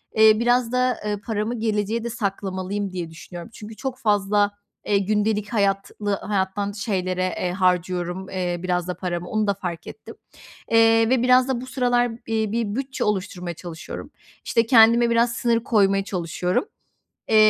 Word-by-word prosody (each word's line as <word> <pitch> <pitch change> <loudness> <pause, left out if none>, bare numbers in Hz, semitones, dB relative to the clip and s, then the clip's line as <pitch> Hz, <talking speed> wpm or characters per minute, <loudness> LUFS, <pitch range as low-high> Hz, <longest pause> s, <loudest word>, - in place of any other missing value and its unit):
Eee, 220 0 +6
biraz 240 0 +2
da, 250 0 +1
eee, 210 0 -1
paramı 225 +1 -2
geleceğe 220 +1 -1
de 235 - -3
saklamalıyım, 200 -2 -3
diye 175 -3 -4
düşünüyorum. 170 +4 -10
Çünkü 215 +1 -10
çok 260 +3 -4
fazla, 205 -2 +2 0.3
eee, 205 - +2
gündelik 210 +2 0
hayatlı 200 0 0
hayattan 200 0 -2
şeylere, 185 -3 -2 0.2
eee, 180 - -1
harcıyorum, 180 0 0
eee, 180 -2 -2
biraz 180 -1 -1
da 180 - -3
paramı. 175 -1 -4
Onu 215 -1 0
da 200 - +3
fark 175 -4 -6
ettim, - - -10 0.6
eee, 225 0 +5
ve 255 -1 +2
biraz 255 0 +5
da 260 -3 -1
bu 255 - -8
sıralar 245 -2 +1 0.2
bi 220 -2 0
bir 220 -2 -1
bütçe 270 +1 -3
oluşturmaya 185 -3 -2
çalışıyorum. 165 -1 -8 0.3
İşte, 230 - +2
kendime 235 0 +6
biraz 235 0 +2
sınır 230 -1 +1
koymaya 195 -5 +3
çalışıyorum, 180 - -1 0.6
eee, 220 - +3
210 Hz, 160 wpm, -23 LUFS, 185-230 Hz, 0.6 s, Eee